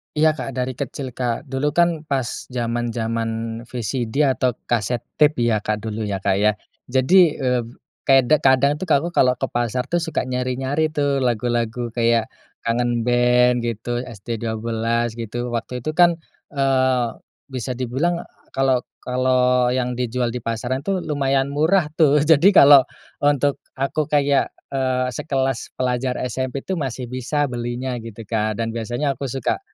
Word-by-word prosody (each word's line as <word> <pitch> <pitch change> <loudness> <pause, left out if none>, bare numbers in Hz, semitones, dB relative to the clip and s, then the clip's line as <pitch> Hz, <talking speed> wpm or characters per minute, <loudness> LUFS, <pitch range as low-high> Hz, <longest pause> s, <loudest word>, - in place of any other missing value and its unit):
Iya, 155 +1 +4
Kak, 135 -3 -6
dari 130 0 -1
kecil, 130 -3 -4
Kak, 120 -2 -2
dulu 140 +2 -2
kan 170 -3 +2
pas 130 -4 -2
zaman-zaman 115 -2 -2 0.4
VCD 120 +3 -1
atau 130 -3 +1
kaset 120 0 -1 0.2
tape, 150 -5 +4
ya, 110 -3 +2
Kak, 105 0 -3
dulu, 110 -1 -3
ya, 95 -1 -3
Kak, 95 - +2
ya. 105 0 +3 0.3
Jadi, 150 +6 +4
eee, 125 -3 0 0.4
kay 135 -1 +6 0.2
kadang 140 +2 +3
tuh 185 - -5
aku 160 +3 +2
kalau 125 -5 +3
ke 130 - -9
pasar 120 +1 -1
tuh 175 - +2
suka 160 -3 -2
nyari-nyari 130 +4 -1
tuh 145 -3 0
lagu-lagu 120 -1 -1
kayak 115 -1 +1 0.3
Kangen 120 0 0
Band, 125 0 +3
gitu, 120 +1 -3
ST12, 115 +1 -2
gitu. 120 +2 -4
Waktu 120 +1 -4
itu 155 - -1
kan, 175 +1 +4 0.3
eee, 130 -3 +1 0.4
bisa 125 -1 -4
dibilang 130 +8 -1 0.3
kalau 135 -2 +1 0.2
kalau 125 0 +2
yang 125 -1 -2
dijual 120 -1 -1
di 125 - -4
pasaran 115 +3 -2
tuh 185 +5 -2
lumayan 140 -2 0
murah 155 +2 +2
tuh. 150 -2 +4
Jadi 165 +6 +5
kalau 140 -4 +8 0.3
untuk 145 -1 +2 0.2
aku 140 +3 -1
kayak, 145 -2 +2 0.2
eee, 130 -1 0
sekelas 135 -3 -2
pelajar 125 0 -1
SMP 130 +2 -3
tuh 190 -2 -3
masih 130 -3 -3
bisa 135 +2 -1
belinya 120 +1 -3
gitu, 115 0 -9
Kak. 110 0 -1
Dan 115 - -3
biasanya 120 +5 -2
aku 135 +1 -4
suka 135 - -2
125 Hz, 150 wpm, -21 LUFS, 120-140 Hz, 0.4 s, kalau